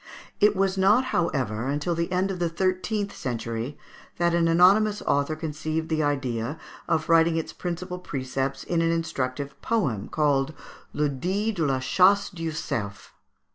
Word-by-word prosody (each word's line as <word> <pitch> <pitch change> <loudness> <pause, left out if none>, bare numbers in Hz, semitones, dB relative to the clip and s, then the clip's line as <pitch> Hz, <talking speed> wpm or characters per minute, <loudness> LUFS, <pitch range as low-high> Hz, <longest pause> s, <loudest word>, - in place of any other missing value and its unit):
It 210 0 +5
was 195 0 +1
not, 210 +7 +4
however, 125 - 0
until 145 +5 -1
the 170 +1 -2
end 185 +2 +1
of 185 - -5
the 170 -1 +1
thirteenth 185 +4 -1
century 115 +2 -4 0.4
that 170 0 +2
an 170 -1 +3
anonymous 195 +5 +4
author 145 +2 +1
conceived 155 +1 -3
the 160 -1 +1
idea 135 -2 -1 0.3
of 160 -2 0
writing 165 0 +4
its 160 - -3
principal 180 +1 -5
precepts 135 -3 -3
in 170 -1 0
an 165 0 +2
instructive 140 -4 -3
poem, 135 - 0
called 145 -1 +1 0.4
"Le 150 0 +1
Dict 190 +10 -2
de 165 - +1
la 135 -1 +1
Chace 195 +9 +3
du 165 -3 -4
Cerf." 105 -9 -4
165 Hz, 155 wpm, -26 LUFS, 140-185 Hz, 0.4 s, It